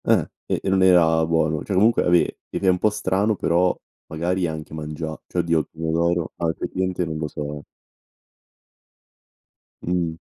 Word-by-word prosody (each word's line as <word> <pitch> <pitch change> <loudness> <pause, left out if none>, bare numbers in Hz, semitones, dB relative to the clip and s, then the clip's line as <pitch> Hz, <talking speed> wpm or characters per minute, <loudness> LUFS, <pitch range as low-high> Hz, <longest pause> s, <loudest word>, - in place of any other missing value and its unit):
Eh, - - +3 0.2
e - - 0
e - - -1
non 95 0 +3
era 85 -3 +5
buono, 80 -2 +1
cioè 100 - -3
comunque 110 +5 +4
ave 85 -1 +2
ed - - -4
è - - +2
un 90 0 +2
po' 105 - +3
strano 105 +1 0
però 90 0 +2 0.3
magari 85 +3 -1
anche 80 -1 -6
mangia 80 0 -5
cioè 90 - -3
oddio, 85 -1 +2
il 75 - -4
pomodoro, 80 +1 -1
ah 85 - -1
effettivamente 90 +2 -2
non 80 -1 -4
lo 75 - -2
so. 75 0 -6 2.2
Mh-mh. 85 -2 -1
85 Hz, 165 wpm, -23 LUFS, 80-90 Hz, 2.2 s, era